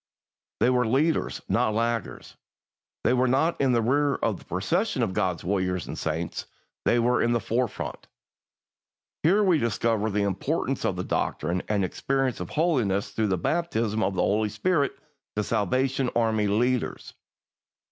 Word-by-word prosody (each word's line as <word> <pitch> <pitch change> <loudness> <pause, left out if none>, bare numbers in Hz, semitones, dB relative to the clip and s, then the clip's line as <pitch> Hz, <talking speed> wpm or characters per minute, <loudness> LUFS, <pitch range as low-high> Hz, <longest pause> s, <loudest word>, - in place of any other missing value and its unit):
They 125 - +5
were 125 -2 +2
leaders, 145 +7 +1
not 110 - +1
laggards. 115 -1 -2 0.7
They 120 - +3
were 130 0 +3
not 140 +7 +1
in 135 -2 +3
the 115 -1 +2
rear 140 +4 +2
of 110 -5 -1
the - - -17
procession 165 - 0
of 100 -5 -1
God's 95 -5 -1
warriors 90 -2 -1
and - - -6
saints; 80 +1 -3 0.4
they 120 - +4
were 120 +1 +2
in 120 0 +2
the 120 - +2
forefront. 120 -1 -3 1.1
Here 195 +7 +4
we 180 -5 +4
discover 115 -2 0
the 105 0 0
importance 95 -2 -1
of - - 0
the - - -3
doctrine 85 +4 -1
and 100 -3 +1
experience 135 +5 -1
of 90 - -5
holiness 125 - +1
through 110 -1 0
the 95 -2 +1
baptism 115 - 0
of 95 -1 0
the 90 - +1
Holy 105 +1 +1
Spirit 140 - +1 0.4
to 105 - 0
Salvation 130 +5 0
Army 110 -3 +2
leaders. 120 +4 0
115 Hz, 155 wpm, -26 LUFS, 100-130 Hz, 1.1 s, They